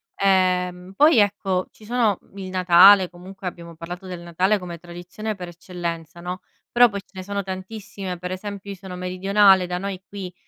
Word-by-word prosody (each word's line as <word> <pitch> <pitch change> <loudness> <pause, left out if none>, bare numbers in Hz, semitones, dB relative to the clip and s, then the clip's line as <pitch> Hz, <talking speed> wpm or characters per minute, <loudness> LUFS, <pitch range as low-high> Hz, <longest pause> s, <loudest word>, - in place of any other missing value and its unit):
Ehm, 185 -1 +1
poi, 295 -3 +6
ecco, 195 -2 +1
ci 215 - -18
sono, 230 -4 +1
mhmm, 200 - -20
il 185 -1 -6
Natale, 185 +1 +7
comunque 185 +2 -12
abbiamo 170 -1 -8
parlato 175 +3 -8
del 180 -2 -7
Natale 180 +5 +1
come 175 -3 -8
tradizione 175 +5 -6
per 180 -2 -7
eccellenza, 170 -1 -6
no, 180 +3 -5 0.3
però 240 0 +6
poi 200 -1 -5
ce - - -34
ne 185 -1 -7
sono 200 0 -3
tantissime. 190 0 -6
Per 180 +1 -6
esempio, 200 +1 -6
io - - -6
sono 190 -2 -9
meridionale, 190 +1 +3
da 180 0 -2
noi 195 0 -5
qui, 190 -3 -7
185 Hz, 185 wpm, -23 LUFS, 180-200 Hz, 0.3 s, Natale